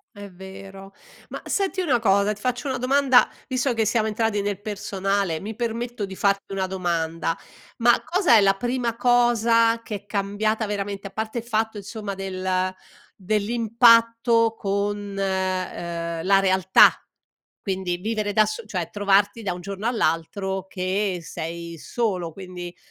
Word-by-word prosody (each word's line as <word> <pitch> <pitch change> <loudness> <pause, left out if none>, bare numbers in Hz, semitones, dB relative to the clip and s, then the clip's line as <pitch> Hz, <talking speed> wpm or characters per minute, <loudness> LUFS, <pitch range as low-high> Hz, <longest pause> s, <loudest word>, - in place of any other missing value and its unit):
È 205 0 -9
vero, 195 +1 -11 0.4
ma - - -6
senti 385 -1 -1
una 265 -9 +2
cosa, 200 -1 +3
ti 210 - -14
faccio 250 +3 -2
una 260 -2 -2
domanda 260 0 +4 0.2
visto 255 -1 0
che 225 -1 +1
siamo 220 0 +1
entrati 220 -1 0
nel 200 -1 -2
personale, 195 -4 -2
mi 215 +2 -6
permetto 235 -1 -3
di 190 - -8
farti 200 0 0
una 190 -1 -1
domanda: 165 -3 -2 0.4
ma 240 0 +4
cosa 360 - +3
è 215 - +7
la 195 0 +4
prima 240 +1 -2
cosa 230 -1 +3
che 210 - -5
è 200 0 -8
cambiata 210 +2 -1
veramente 200 -1 -4
a 195 - -11
parte 220 +2 -4
il 230 - -3
fatto 220 -2 -1
insomma 205 0 -6
del 185 -1 -2 0.5
dell'impatto 230 +2 +3
con, 200 0 -2
ehm, 185 -3 -2
la 195 0 +5
realtà, 190 -1 +6 0.7
quindi, 190 -3 -2
vivere 210 +2 -2
da 215 +1 +5
s 215 +2 -5
cioè 180 -5 -3
trovarti 205 +2 +2
da 195 -4 -2
un 180 - -8
giorno 200 +3 -4
all'altro 190 -2 -1
che 190 +1 -1
sei 170 0 -6
solo, 185 -8 -2
quindi 180 -1 -8
205 Hz, 150 wpm, -24 LUFS, 190-230 Hz, 0.7 s, è